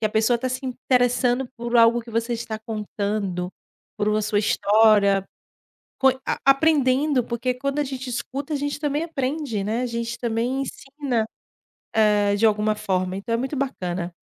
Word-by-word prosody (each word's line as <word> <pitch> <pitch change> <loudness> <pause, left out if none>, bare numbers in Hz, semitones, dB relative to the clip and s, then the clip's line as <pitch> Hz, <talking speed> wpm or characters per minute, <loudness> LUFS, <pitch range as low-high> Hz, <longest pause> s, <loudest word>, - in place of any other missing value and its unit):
que - - -2
a - - -1
pessoa 220 +3 +2
tá 255 +2 -2
se 255 +2 -4
interessando 250 0 +1
por 235 +1 -1
algo 230 +1 +5
que 230 - -12
você 230 +2 -1
está 225 -2 -4
contando, 205 -4 -3 0.5
por 205 - 0
uma 215 0 +2
sua 210 0 +1
história, 205 -2 +4 0.7
coi 265 -1 +3
a - - -1
aprendendo, 275 -2 +3
porque 240 +1 -1
quando 275 +3 -3
a 290 - +1
gente 265 -1 -6
escuta 260 +4 -4
a - - +1
gente 285 +1 -3
também 295 +1 -1
aprende, 275 -8 -2
né, 220 +4 -1
a 250 - 0
gente 235 0 -3
também 240 +3 -1
ensina, 270 -4 -3 0.9
hã, 205 -1 +2
de 220 - +2
alguma 215 0 +1
forma, 185 -2 -1
então 200 +4 -4
é 230 - +2
muito 265 +4 -3
bacana. 180 -10 -3
235 Hz, 170 wpm, -23 LUFS, 215-265 Hz, 0.9 s, algo